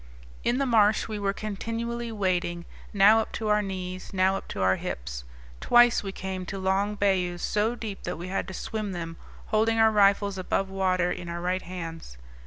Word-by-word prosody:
In 240 Hz, -, +1 dB
the 275 Hz, -, +1 dB
marsh 215 Hz, -4 st, +3 dB
we 215 Hz, -2 st, -4 dB
were 200 Hz, -1 st, +1 dB
continually 230 Hz, +3 st, -4 dB
wading, 180 Hz, -4 st, -1 dB, 0.3 s
now 205 Hz, +2 st, +6 dB
up 220 Hz, -, -3 dB
to 220 Hz, -1 st, -2 dB
our 210 Hz, 0 st, +4 dB
knees, 185 Hz, -2 st, -5 dB
now 190 Hz, 0 st, +2 dB
up -, -, -6 dB
to 95 Hz, -, -5 dB
our 95 Hz, 0 st, +3 dB
hips. -, -, -5 dB, 0.3 s
Twice 240 Hz, -, +5 dB
we 195 Hz, -, -5 dB
came 190 Hz, -1 st, -5 dB
to 195 Hz, -, -4 dB
long 195 Hz, +2 st, 0 dB
bayous 185 Hz, -3 st, 0 dB
so 215 Hz, +3 st, +1 dB
deep 215 Hz, -4 st, -6 dB
that -, -, -4 dB
we 175 Hz, +2 st, -6 dB
had 190 Hz, -, -2 dB
to 190 Hz, -, -7 dB
swim 215 Hz, -1 st, -4 dB
them, 165 Hz, -1 st, -5 dB, 0.4 s
holding 225 Hz, +1 st, +3 dB
our 220 Hz, 0 st, +5 dB
rifles 200 Hz, -1 st, +3 dB
above 190 Hz, +1 st, -1 dB
water 185 Hz, -2 st, +1 dB
in 180 Hz, -1 st, -5 dB
our 170 Hz, 0 st, -4 dB
right 180 Hz, +2 st, -1 dB
hands. 165 Hz, -, -7 dB
195 Hz, 195 wpm, -27 LUFS, 180-215 Hz, 0.4 s, now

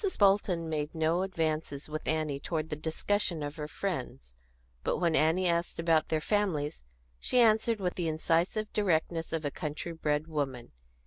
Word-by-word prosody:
Bolton 195 Hz, -4 st, +3 dB
made 155 Hz, 0 st, -2 dB
no 160 Hz, +2 st, +2 dB
advances 160 Hz, -6 st, -2 dB
with 155 Hz, 0 st, -5 dB
Annie 155 Hz, -3 st, 0 dB
toward 160 Hz, +1 st, -3 dB
the -, -, 0 dB
discussion 165 Hz, +2 st, -1 dB
of 145 Hz, +1 st, -5 dB
her 150 Hz, -1 st, -4 dB
friends; 135 Hz, -, -4 dB, 0.5 s
but -, -, +1 dB
when 170 Hz, -3 st, +2 dB
Annie 165 Hz, +4 st, +3 dB
asked 170 Hz, 0 st, 0 dB
about 165 Hz, -1 st, +2 dB
their 160 Hz, -, +2 dB
families, 155 Hz, -, 0 dB, 0.4 s
she 250 Hz, -, +2 dB
answered 225 Hz, -1 st, +4 dB
with 180 Hz, -2 st, -1 dB
the 175 Hz, -2 st, -2 dB
incisive 165 Hz, +7 st, 0 dB
directness 165 Hz, -4 st, +1 dB
of 160 Hz, -2 st, -2 dB
a 145 Hz, -, 0 dB
country 155 Hz, +2 st, -4 dB
bred 150 Hz, -2 st, 0 dB
woman. 140 Hz, -6 st, -3 dB
160 Hz, 165 wpm, -30 LUFS, 155-180 Hz, 0.5 s, answered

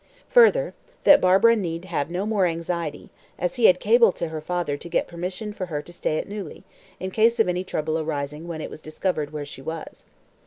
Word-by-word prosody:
Further, -, -, +5 dB, 0.3 s
that 290 Hz, 0 st, +7 dB
Barbara 195 Hz, +6 st, +5 dB
need 170 Hz, -4 st, -3 dB
have 165 Hz, -5 st, -2 dB
no 180 Hz, +3 st, -2 dB
more 210 Hz, -4 st, +2 dB
anxiety, 165 Hz, -2 st, -4 dB, 0.3 s
as 180 Hz, +4 st, -2 dB
he 235 Hz, -, +3 dB
had 180 Hz, 0 st, +6 dB
cabled 225 Hz, -1 st, +4 dB
to 170 Hz, -, -3 dB
her 160 Hz, -1 st, -5 dB
father 175 Hz, -2 st, -2 dB
to 170 Hz, -, -9 dB
get -, -, 0 dB
permission 180 Hz, +5 st, -5 dB
for 185 Hz, -3 st, -5 dB
her 150 Hz, -3 st, -4 dB
to 175 Hz, -, -12 dB
stay 155 Hz, -2 st, -1 dB
at -, -, -3 dB
Neuilly, 205 Hz, -1 st, -7 dB, 0.4 s
in 185 Hz, 0 st, -4 dB
case 230 Hz, +3 st, +3 dB
of 225 Hz, -, +4 dB
any 180 Hz, 0 st, -1 dB
trouble 155 Hz, -3 st, -2 dB
arising 150 Hz, 0 st, -4 dB
when 165 Hz, -2 st, -5 dB
it -, -, -6 dB
was -, -, -10 dB
discovered 155 Hz, -1 st, -2 dB
where 150 Hz, -1 st, -5 dB
she 140 Hz, -, -10 dB
was. 160 Hz, +2 st, -7 dB
175 Hz, 210 wpm, -24 LUFS, 155-200 Hz, 0.4 s, that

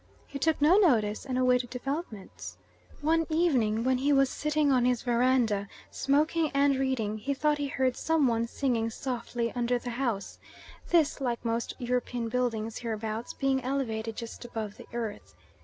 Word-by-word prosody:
He 280 Hz, -, -7 dB
took 320 Hz, +3 st, +1 dB
no 310 Hz, +6 st, +5 dB
notice 230 Hz, -, +2 dB
and 255 Hz, -1 st, -1 dB
awaited 250 Hz, -1 st, +2 dB
developments. 260 Hz, -, -6 dB, 0.4 s
One 325 Hz, +2 st, +2 dB
evening 255 Hz, -10 st, +2 dB
when 255 Hz, 0 st, +2 dB
he 280 Hz, +3 st, +2 dB
was 275 Hz, -1 st, +4 dB
sitting 300 Hz, -1 st, +1 dB
on 255 Hz, -2 st, +3 dB
his 245 Hz, -1 st, +1 dB
verandah, 240 Hz, -4 st, +2 dB, 0.2 s
smoking 300 Hz, +3 st, +1 dB
and 280 Hz, 0 st, +4 dB
reading, 235 Hz, -6 st, -1 dB
he 280 Hz, +6 st, -2 dB
thought 300 Hz, +1 st, +1 dB
he 285 Hz, -, -1 dB
heard 260 Hz, -2 st, 0 dB
some 320 Hz, -3 st, +1 dB
one 230 Hz, -1 st, +1 dB
singing 235 Hz, -3 st, 0 dB
softly 240 Hz, -1 st, -3 dB
under 245 Hz, 0 st, 0 dB
the 245 Hz, 0 st, -5 dB
house, 235 Hz, -5 st, -3 dB, 0.5 s
this, 315 Hz, -4 st, +3 dB
like 240 Hz, -2 st, -2 dB
most 230 Hz, 0 st, -1 dB
European 245 Hz, -2 st, -2 dB
buildings 225 Hz, -3 st, -1 dB
hereabouts, 225 Hz, 0 st, -4 dB
being 270 Hz, -1 st, 0 dB
elevated 225 Hz, -4 st, -2 dB
just 230 Hz, +1 st, -7 dB
above 225 Hz, -4 st, -5 dB
the -, -, -12 dB
earth. 225 Hz, -3 st, -5 dB
250 Hz, 160 wpm, -29 LUFS, 230-280 Hz, 0.5 s, no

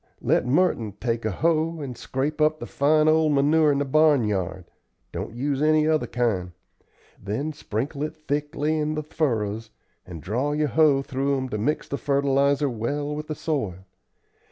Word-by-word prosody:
Let -, -, +1 dB
Merton 125 Hz, -, +1 dB
take 115 Hz, -1 st, -2 dB
a -, -, +1 dB
hoe 160 Hz, -, 0 dB
and 135 Hz, -4 st, -5 dB
scrape 140 Hz, +6 st, -3 dB
up 155 Hz, 0 st, +3 dB
the -, -, -7 dB
fine 155 Hz, +2 st, +2 dB
old 155 Hz, -1 st, +4 dB
manure 150 Hz, +2 st, +4 dB
in 140 Hz, -, +1 dB
the 145 Hz, -, 0 dB
barnyard. 115 Hz, -, +2 dB, 0.5 s
Don't -, -, -6 dB
use 140 Hz, +2 st, -1 dB
any 155 Hz, 0 st, +3 dB
other 155 Hz, -1 st, +1 dB
kind. 100 Hz, -8 st, -1 dB, 0.7 s
Then 120 Hz, +10 st, -3 dB
sprinkle 140 Hz, +2 st, -4 dB
it 155 Hz, +1 st, -3 dB
thickly 150 Hz, +1 st, -2 dB
in 155 Hz, 0 st, -1 dB
the 155 Hz, -, -3 dB
furrows, 115 Hz, -8 st, -2 dB, 0.3 s
and 85 Hz, -3 st, -9 dB
draw 120 Hz, -, -1 dB
your 150 Hz, 0 st, 0 dB
hoe 145 Hz, -1 st, +4 dB
through 135 Hz, +1 st, -1 dB
'em 130 Hz, -1 st, -3 dB
to 105 Hz, -, -3 dB
mix 150 Hz, +8 st, -1 dB
the 140 Hz, -, -4 dB
fertilizer 140 Hz, 0 st, +2 dB
well 145 Hz, +5 st, -3 dB
with 150 Hz, 0 st, -6 dB
the 155 Hz, -, -4 dB
soil. 105 Hz, -, -3 dB
140 Hz, 170 wpm, -24 LUFS, 120-155 Hz, 0.7 s, old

